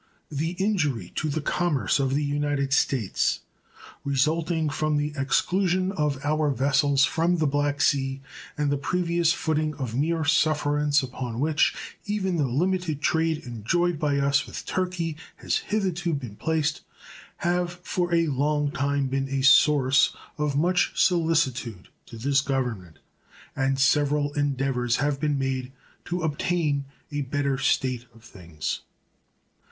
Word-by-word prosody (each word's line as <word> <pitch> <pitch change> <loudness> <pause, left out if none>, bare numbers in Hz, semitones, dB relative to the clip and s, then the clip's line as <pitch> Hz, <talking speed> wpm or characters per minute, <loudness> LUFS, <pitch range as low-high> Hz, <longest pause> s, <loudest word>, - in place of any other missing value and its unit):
The 155 +4 -2
injury 180 - -1
to 155 - -2
the 155 +2 -2
commerce 150 - 0
of 135 0 +1
the 150 - +1
United 145 -1 0
States 130 -8 +1 0.6
resulting 155 +4 +1
from 150 +1 0
the 145 0 -1
exclusion 185 +6 +1
of 150 -7 -1
our 155 0 +1
vessels 140 +1 +3
from 170 +2 +1
the 160 - +1
Black 145 0 0
Sea 135 -2 +1 0.4
and 145 -1 +1
the 145 - 0
previous 170 0 +1
footing 155 -2 -1
of 130 -6 -4
mere 160 +5 0
sufferance 145 -1 +2
upon 125 -2 -5
which 150 +2 +2 0.3
even 195 -4 -1
the 145 -4 +1
limited 170 +3 0
trade 160 -2 +1
enjoyed 150 - 0
by 145 -2 +1
us 140 0 +2
with - - -7
Turkey 180 -4 -2 0.2
has - - -1
hitherto 180 -5 -1
been 125 -7 -6
placed 155 +2 -1 0.6
have 175 0 0
for 175 -1 -1
a 165 -1 +3
long 145 0 0
time 140 0 0
been 135 +1 -2
a 135 -1 -1
source 140 -1 +5 0.2
of 150 -2 -1
much 180 +4 +2
solicitude 135 - +1 0.2
to 115 - -10
this 135 +4 +2
Government, 125 - -3 0.6
and 135 0 +1
several 145 +1 +2
endeavors 135 -4 0
have 145 0 0
been 150 -1 0
made 135 -1 -2 0.3
to 175 0 -3
obtain 150 -2 0 0.3
a 145 0 -2
better 140 0 -1
state 130 -2 0
of 115 - -18
things. 85 -8 -5
145 Hz, 140 wpm, -25 LUFS, 135-160 Hz, 0.6 s, source